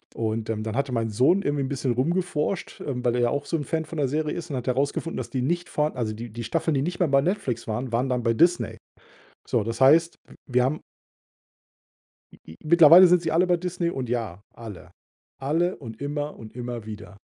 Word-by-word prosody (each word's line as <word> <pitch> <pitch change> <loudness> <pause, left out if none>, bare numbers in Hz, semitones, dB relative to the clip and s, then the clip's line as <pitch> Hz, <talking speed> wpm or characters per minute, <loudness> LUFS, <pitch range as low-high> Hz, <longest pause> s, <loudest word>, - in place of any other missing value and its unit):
Und, 110 0 -2
ähm, 110 -1 -2
dann 110 0 -4
hatte 140 0 -1
mein 115 -2 -1
Sohn 130 - +3
irgendwie 145 -1 0
'n 130 - -3
bisschen 135 -3 -1
rumgeforscht, 170 +5 -2
ähm, 125 -3 -4
weil 120 0 +2
er 120 - +1
ja 120 - +3
auch 145 0 -2
so 165 - -1
'n 145 - -4
Fan 160 +2 -2
von 165 - -8
der 140 - +2
Serie 150 +1 -1
ist 170 0 -6
und 135 - -2
hat 125 - -6
herausgefunden, 140 +5 -1
dass - - -5
die 130 - -2
nicht 175 +5 -1
vorhan 150 -1 -1
also 115 -3 -2
die 115 +1 -8
die 120 +1 -6
Staffeln, 150 +7 -1
die 135 - +1
nicht 175 +4 -3
mehr 175 - +3
bei 140 0 +4
Netflix 140 - -2
waren, 120 +3 -3
waren 125 +3 0
dann 125 -2 -1
bei 115 - +2
Disney. 170 +8 +2 0.7
So, 115 -4 +1
das 115 +2 -4
heißt, 160 +6 +5
w - - -15 0.2
wir 125 - +4
haben 145 +4 -1 1.5
I - - -17
i 80 - -12
mittlerweile 170 +3 +8
sind 175 -1 +4
sie 160 -2 -2
alle 175 +3 +3
bei 175 -1 +3
Disney 175 -1 -2
und 130 -7 -4
ja, 110 -5 -3
alle. 105 -6 -10 0.5
Alle 165 +7 0
und 115 -2 -10
immer 145 +1 -4
und 110 -1 -11
immer 120 -2 -6
wieder. 105 -2 -9
135 Hz, 230 wpm, -25 LUFS, 115-165 Hz, 1.5 s, mittlerweile